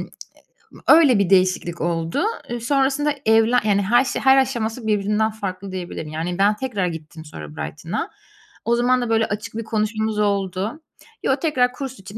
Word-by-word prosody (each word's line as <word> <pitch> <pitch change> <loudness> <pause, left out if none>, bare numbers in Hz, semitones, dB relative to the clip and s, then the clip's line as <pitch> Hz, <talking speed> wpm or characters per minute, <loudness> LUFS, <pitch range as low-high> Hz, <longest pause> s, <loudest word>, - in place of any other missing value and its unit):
ııı, - - -6 0.8
öyle 295 -9 +6
bir 200 -3 +1
değişiklik 185 -2 +2
oldu. 165 -1 -1 0.4
Sonrasında 280 +3 +1
evlen 225 +2 +4
yani, 200 -1 +3
her 240 +7 +3
şey - - -3
her 265 0 +6
aşaması 235 -3 -1
birbirinden 210 +1 +1
farklı 195 -2 -6
diyebilirim. 175 -4 -6
Yani, 165 +3 -3
ben 200 +2 +3
tekrar 210 -6 -2
gittim 160 -1 -8
sonra 75 - -10
Brighton'a. 75 +1 -4 0.6
O 235 +1 +2
zaman 250 +1 +2
da, 240 - -2
böyle, 225 0 +3
açık 210 +1 -5
bir 230 - -3
konuşmamız 215 0 -1
oldu. 200 - -1 0.4
Yo, 265 - +2
tekrar 260 -5 +1
kurs 265 -3 -7
için 195 +3 -10
215 Hz, 165 wpm, -21 LUFS, 185-245 Hz, 0.8 s, öyle